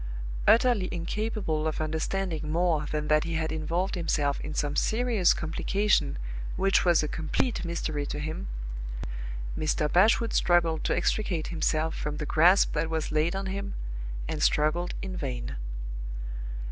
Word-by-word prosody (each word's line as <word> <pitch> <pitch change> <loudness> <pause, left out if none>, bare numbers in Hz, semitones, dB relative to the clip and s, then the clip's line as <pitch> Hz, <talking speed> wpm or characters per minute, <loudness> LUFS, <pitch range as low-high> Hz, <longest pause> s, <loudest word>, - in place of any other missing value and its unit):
Utterly 230 -5 +5
incapable 175 -3 -1
of 155 - -2
understanding 160 0 -2
more 165 -3 +1
than 150 0 -2
that 155 0 +4
he 165 0 -3
had 160 -1 -1
involved 165 +4 -1
himself 150 -5 0
in 155 - -5
some 145 0 -1
serious 220 -1 +3
complication 170 - +1 0.4
which 195 0 +3
was 170 -3 +4
a - - 0
complete 160 - -1
mystery 155 -4 -2
to - - -3
him, 155 - -4 1.1
Mr. 155 -1 0
Bashwood 220 +5 +4
struggled 170 -2 +3
to - - +1
extricate 180 -7 0
himself 160 -1 0
from 150 0 -3
the 150 - -3
grasp 175 +6 +5
that 160 +2 0
was 160 -1 -2
laid 155 +4 +1
on 195 0 -2
him, 200 +1 -4 0.5
and - - -3
struggled 160 +4 +2
in 190 -1 -4
vain. - - -4
165 Hz, 145 wpm, -28 LUFS, 155-190 Hz, 1.1 s, Utterly